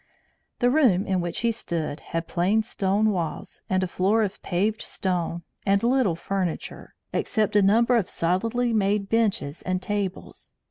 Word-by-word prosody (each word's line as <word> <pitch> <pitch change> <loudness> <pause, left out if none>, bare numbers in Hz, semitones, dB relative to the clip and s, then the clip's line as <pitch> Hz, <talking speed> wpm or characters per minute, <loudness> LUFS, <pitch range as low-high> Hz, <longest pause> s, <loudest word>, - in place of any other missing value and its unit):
The 245 0 +3
room 245 -11 +3
in 190 -2 0
which 175 -1 -3
he 235 0 +2
stood 165 -8 -3
had 165 0 -4
plain 195 +6 +1
stone 210 0 +1
walls 170 -6 -4
and 185 0 +1
a - - 0
floor 200 +5 +2
of 205 -1 -4
paved 205 +5 -1
stone, 170 -2 -2 0.2
and 200 +1 +2
little 240 -7 +2
furniture, 180 0 -4 0.2
except 215 -4 0
a 205 - +6
number 230 +5 +4
of 215 -6 +1
solidly 230 +8 0
made 200 -1 +1
benches 205 -10 0
and 185 0 -1
tables. 195 0 -4
195 Hz, 155 wpm, -25 LUFS, 180-220 Hz, 0.2 s, a